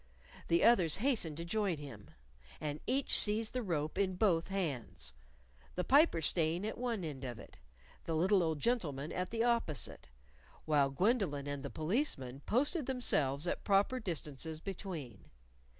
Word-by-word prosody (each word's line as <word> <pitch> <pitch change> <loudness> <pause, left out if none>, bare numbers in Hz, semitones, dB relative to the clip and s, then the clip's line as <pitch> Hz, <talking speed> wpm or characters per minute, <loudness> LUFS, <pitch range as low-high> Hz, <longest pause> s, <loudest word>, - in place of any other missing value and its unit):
The 170 - +3
others 185 -10 +5
hastened 210 - 0
to 170 - -5
join 200 -2 0
him. 135 -8 -10 0.5
And 150 0 -3
each 265 +2 +3
seized 215 +1 +1
the 255 - -1
rope 155 -7 -2
in 190 -2 +1
both 180 -4 +2
hands, 140 - -3 0.6
the 180 - 0
Piper 275 - +4
staying 165 +4 +1
at 220 - -4
one 235 -6 -1
end 145 -4 -5
of 120 -3 -5
it, - - -13 0.5
the 165 - -1
little 185 +4 +4
old 160 -3 0
gentleman 155 - -1
at 180 0 -2
the 225 0 0
opposite, 235 - -1 0.6
while 145 -3 +3
Gwendolyn 175 - +1
and 145 -1 -4
the 140 - -5
Policeman 155 - -1
posted 285 - +1
themselves 155 - +1
at 175 - -2
proper 205 +6 +3
distances 160 - -4
between. 165 - -6
170 Hz, 150 wpm, -34 LUFS, 145-220 Hz, 0.6 s, others